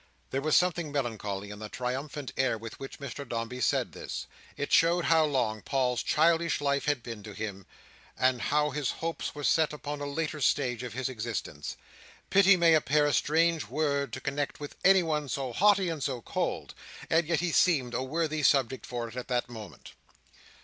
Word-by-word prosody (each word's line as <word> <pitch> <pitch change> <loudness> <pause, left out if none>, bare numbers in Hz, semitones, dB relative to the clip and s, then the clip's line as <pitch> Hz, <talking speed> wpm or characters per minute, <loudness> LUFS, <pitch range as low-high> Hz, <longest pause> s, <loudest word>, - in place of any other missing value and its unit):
There 135 - -1
was 155 +1 +3
something 175 -4 +1
melancholy 105 -7 -3
in 105 - -9
the 110 -1 -7
triumphant 130 +4 -4
air 130 -3 +1
with 115 0 -9
which 135 - -8
Mr 140 -1 -6
Dombey 115 +2 -3
said - - +1
this. - - -6 0.3
It 145 - -3
showed 170 +1 +4
how 160 -1 +5
long 120 -7 0
Paul's 125 -1 0
childish 165 +1 +2
life 140 -1 0
had 145 -5 0
been 115 -3 -7
to 105 0 -9
him, 100 -3 -6 0.5
and 130 -1 +2
how 150 +1 +1
his 145 -2 -1
hopes 165 -2 -4
were 145 - -6
set 160 +1 +3
upon 145 -1 -5
a 145 - -3
later 155 +1 -3
stage 125 -4 +1
of 125 -2 -6
his 130 +2 -2
existence. 110 - -5 0.5
Pity 195 0 +6
may 170 -1 +5
appear 150 -1 +3
a 145 - +1
strange 165 +1 +2
word 140 -2 0
to - - -4
connect 145 +1 -3
with 145 -1 -7
anyone 160 -7 +3
so 130 0 -3
haughty 200 - +4
and 165 -3 -3
so 130 -2 -1
cold, - - -3 0.3
and 165 -1 +2
yet 165 -2 +1
he 175 -1 0
seemed 140 -11 +3
a - - 0
worthy 155 +3 -1
subject 135 -3 +2
for 120 -1 -4
it 115 - -11
at 125 - -5
that 125 -1 -1
moment. 110 -4 -10
140 Hz, 190 wpm, -29 LUFS, 125-155 Hz, 0.5 s, Pity